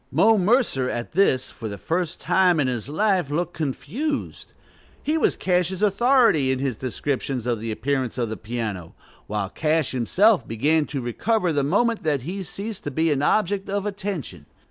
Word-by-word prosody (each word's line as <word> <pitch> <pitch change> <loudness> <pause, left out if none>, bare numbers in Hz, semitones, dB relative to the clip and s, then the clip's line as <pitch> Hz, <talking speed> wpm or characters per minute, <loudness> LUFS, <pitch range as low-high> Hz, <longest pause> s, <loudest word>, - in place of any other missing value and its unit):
Mo 225 +1 +5
Mercer 200 - +2
at 120 -1 -4
this, 155 -8 +2
for 110 -3 -7
the 100 - -6
first 165 - -2
time 180 -3 +3
in 145 - +2
his 125 -1 -2
life, 185 -1 +1
looked 160 +3 -2
confused: 240 - -4 0.5
he 305 - 0
was 320 - +2
Cash's 180 +1 0
authority 210 - +4
in 130 - 0
his 135 -2 -2
descriptions 130 0 -3
of 120 -3 0
the 115 +1 -4
appearance 130 +1 -2
of 120 -2 0
the 110 - -3
piano; 105 -7 -5 0.3
while 105 -2 -3
Cash 155 -2 0
himself 185 - +3
began 145 +7 +1
to 140 - -4
recover 175 - 0
the 145 - +2
moment 225 - +1
that 145 -5 0
he 185 +7 -4
ceased 200 +3 -6
to - - -1
be 160 +4 +1
an 140 -1 +1
object 195 +4 +1
of 200 0 -1
attention. 190 - -5
155 Hz, 175 wpm, -23 LUFS, 125-200 Hz, 0.5 s, Mo